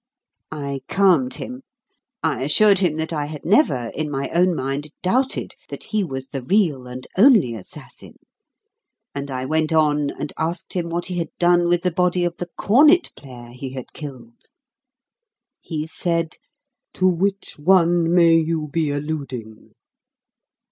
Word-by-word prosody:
I 140 -3 -4
calmed 180 -10 +3
him. 255 +1 -7 0.6
I 155 -5 0
assured 195 +8 +4
him 175 -5 +1
that 160 +1 -3
I 150 -2 -1
had 150 -1 -8
never, 155 - +2
in 155 0 -3
my 140 -1 -3
own 180 0 +3
mind, 135 +2 -3
doubted 255 +8 0 0.2
that - - -7
he 215 -2 -1
was 135 -5 -6
the 135 -1 -5
real 150 - +1
and 125 +1 -8
only 210 - +6
assassin, 110 -5 -10 1.0
and 140 0 -5
I 130 -1 -3
went 155 +2 0
on 150 -2 +2
and 145 - -6
asked 170 +3 -3
him 175 -2 -2
what 170 +1 -2
he 180 -2 -3
had 165 - -3
done 175 0 +3
with 175 0 +2
the 180 - +1
body 180 +1 +1
of 175 -1 -1
the 175 - -5
cornet 300 - +5
player 120 -3 -12
he 130 +1 -7
had 130 -2 -8
killed. 155 - -11 1.1
He 155 -3 -4
said, 165 0 -2 0.6
"To 185 - +2
which 190 0 -1
one 170 0 +3
may 170 -2 +5
you 160 -1 -1
be 155 0 0
alluding?" 140 -7 -5
160 Hz, 155 wpm, -21 LUFS, 140-180 Hz, 1.1 s, only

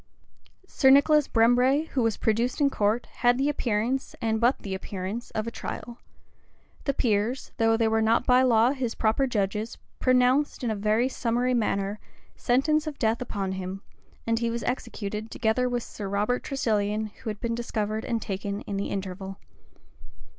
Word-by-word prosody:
Sir 265 - +3
Nicholas 290 +2 +5
Brembre, 250 +6 +3
who 265 - 0
was 225 -2 +1
produced 230 +5 0
in 280 -1 +3
court, 215 +2 +1
had 245 0 +3
the 275 +2 +1
appearance, 245 -1 -1
and 220 -1 0
but 245 +3 +4
the 195 - -6
appearance, 190 +4 -5
of 215 - -1
a 230 - -4
trial: 235 +1 -7 0.9
the 275 - +1
peers, 225 +3 0
though 225 0 +3
they 225 -1 +2
were 220 0 +2
not 225 +2 +2
by 250 0 +5
law 240 -1 +4
his 255 -4 -3
proper 230 +5 +1
judges, 210 -1 -2 0.2
pronounced, 255 +3 +2
in 235 - 0
a - - -1
very 215 +4 +2
summary 250 0 0
manner, 205 -3 0 0.4
sentence 305 +5 +1
of 295 -2 -5
death 225 0 +1
upon 200 -6 -3
him; 190 +1 -5 0.4
and 230 0 +1
he 235 0 0
was 235 0 -3
executed, 220 -3 -4
together 250 +2 0
with 245 -1 -1
Sir 205 - -7
Robert 210 +5 0
Tresilian, 215 -5 -1
who - - -4
had 210 -1 -5
been 235 0 -2
discovered 220 -2 -2
and 230 -2 -1
taken 200 +1 -4
in 200 - -5
the 200 - -2
interval. 195 0 -5
230 Hz, 170 wpm, -26 LUFS, 210-250 Hz, 0.9 s, Nicholas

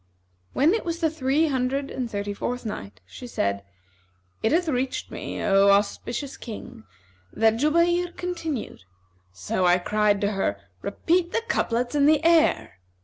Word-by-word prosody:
When 305 +7 +3
it 450 - -1
was 335 -1 -3
the 320 -3 +1
Three 290 +1 +1
Hundred 270 +1 -1
and 250 -3 -3
Thirty 205 -1 -3
fourth 245 +4 -4
Night, 100 - -7
She 245 - -10
said, 100 - -1 0.8
It 220 - +1
hath 340 +2 +2
reached 260 -3 -2
me, - - -5
O 195 0 +4
auspicious 235 +7 0
King, 210 - -9 0.5
that 225 0 +2
"Jubayr 340 +5 +2
continued, 325 - -4 0.5
'So 90 - -2 0.2
cried 210 +1 +2
I - - -7
to 205 0 +1
her, 150 - -1 0.2
Repeat 340 - 0
the - - 0
couplets 245 - 0
and 290 0 +4
the 310 0 +3
air!' 315 - +3
250 Hz, 150 wpm, -25 LUFS, 205-320 Hz, 0.8 s, O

